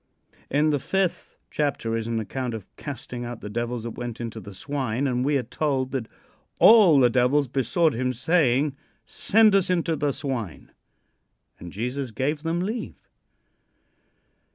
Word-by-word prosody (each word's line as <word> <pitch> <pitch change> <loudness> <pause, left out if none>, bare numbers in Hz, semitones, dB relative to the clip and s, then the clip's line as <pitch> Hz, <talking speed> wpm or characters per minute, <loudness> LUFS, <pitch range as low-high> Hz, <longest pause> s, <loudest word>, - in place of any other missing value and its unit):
'" - - -31
In 155 +1 +3
the 145 - +1
fifth 190 +5 -2
chapter 140 -6 -1
is 115 0 -3
an 115 -1 -1
account 120 +3 -4
of 105 -4 -8
casting 125 -3 -7
out 120 -1 -7
the 105 - -7
devils 120 +1 -3
that 115 - -4
went 120 0 -6
into 115 -1 -5
the 100 - -10
swine, 130 +3 -3
and 125 -2 0
we 145 +1 +2
are 130 - -2
told 135 +1 -1
that 130 -4 -3 0.5
"all 200 -10 +7
the 125 - +6
devils 130 +4 +2
besought 140 +5 +1
him 125 +2 -1
saying, 140 0 +2 0.3
'Send 220 0 +3
us 195 -2 +3
into 170 -2 +1
the 145 -1 0
swine.' 120 - -5 0.9
And 85 - -9
Jesus 125 +6 -3
gave 135 +7 -2
them 165 +2 -1
leave." 220 +6 -5
130 Hz, 160 wpm, -25 LUFS, 120-150 Hz, 0.9 s, all